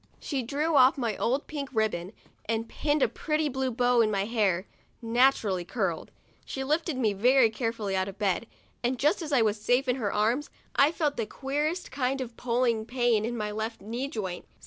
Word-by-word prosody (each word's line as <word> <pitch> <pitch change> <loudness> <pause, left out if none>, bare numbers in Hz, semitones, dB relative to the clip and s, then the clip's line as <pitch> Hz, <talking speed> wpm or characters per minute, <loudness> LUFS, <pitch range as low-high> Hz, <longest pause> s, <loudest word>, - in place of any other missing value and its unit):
She 275 -3 -2
drew 295 +6 -1
off 260 +1 +6
my 230 -5 -1
old 265 +5 0
pink 285 -3 -5
ribbon, 205 -5 -1 0.4
and 225 +1 -1
pinned 295 +2 0
a - - +5
pretty 305 +6 -1
blue 265 -1 -1
bow 245 0 +3
in 220 - +3
my 200 -2 0
hair, 205 -5 +1 0.3
nat 245 +4 +4
urally 190 -5 -2
curly. - - -2 0.4
She 265 - -5
lifted 305 +1 0
me 220 -5 +2
very 240 +3 +4
carefully 225 -4 -2
out 190 0 0
of 195 0 -8
bed, 200 +1 0 0.4
and 250 +2 0
just 300 +9 +2
as 310 -2 -5
I 260 -5 +4
was 210 -1 0
safe 245 +5 +2
in 250 +1 +1
her 210 -6 -1
arms, 230 +8 +1 0.3
I 285 +2 +5
felt 305 -3 -1
the 225 -3 -1
queerest 295 +8 -2
kind 265 0 -1
of 240 -3 -5
pulling 235 -2 +1
pain 240 -3 +2
in 240 +1 -3
my 210 -1 -2
left 220 +2 -4
knee 235 +7 -4
joint. 190 - -5
240 Hz, 200 wpm, -28 LUFS, 215-270 Hz, 0.4 s, off